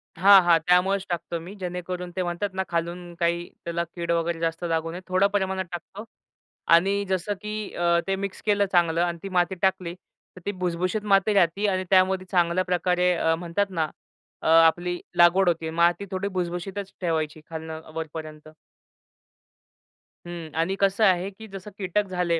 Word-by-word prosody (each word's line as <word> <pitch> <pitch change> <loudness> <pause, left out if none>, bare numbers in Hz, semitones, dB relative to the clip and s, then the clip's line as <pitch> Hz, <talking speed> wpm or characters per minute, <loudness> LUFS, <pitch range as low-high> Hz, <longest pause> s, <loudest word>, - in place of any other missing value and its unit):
हां, 195 +2 +8
हां. 170 -1 +5
त्यामुळेच 190 +2 +3
टाकतो 170 -1 -3
मी. 180 +5 -9
जेणेकरून 180 -1 -5
ते 185 - 0
म्हणतात 175 +4 -2
ना, 190 0 -1
खालून 175 +1 -3
काही 170 0 0 0.2
त्याला 170 0 -1
कीड 170 -1 -2
वगैरे 170 0 0
जास्त 165 +1 -2
लागू 165 0 -1
नये. 180 +2 -7
थोडं 185 +2 +3
प्रमाणात 190 -1 0
टाकतो 190 +5 -8 0.7
आणि 200 +4 +2
जसं 190 +2 -1
की 210 0 -5
अ, 170 0 +2
ते 195 - +1
मिक्स 195 0 -5
केलं 205 -1 +3
चांगलं 170 -2 +3
आणि 170 -1 -1
ती 195 - -5
माती 180 0 +1
टाकली, 185 -3 0 0.4
तर 185 - -12
ती 205 - 0
भुसभुशीत 185 +2 -2
माती 195 +2 +4
राहती 195 +2 +2
आणि 185 -1 0
त्यामध्ये 185 0 +3
चांगल्या 175 0 +2
प्रकारे 180 0 +1
अ, 165 0 +2
म्हणतात 180 +4 -1
ना, 160 -4 -1 0.5
अ, - - -3
आपली 165 +2 +4 0.2
लागवड 175 +2 +6
होते. 160 -1 -1
माती 170 +4 +2
थोडी 190 +1 -2
भुसभुशीतच 185 +1 -4
ठेवायची 155 -2 -1
खालनं 160 0 -6
वरपर्यंत. 155 -1 -7 1.8
हं 170 -2 -7
आणि 190 +4 +1
कसं 195 +2 +2
आहे 185 0 +2
की 220 +3 -12
जसं 195 +1 -9
कीटक 200 +1 -1
झाले 175 -2 0
180 Hz, 165 wpm, -25 LUFS, 170-190 Hz, 1.8 s, हां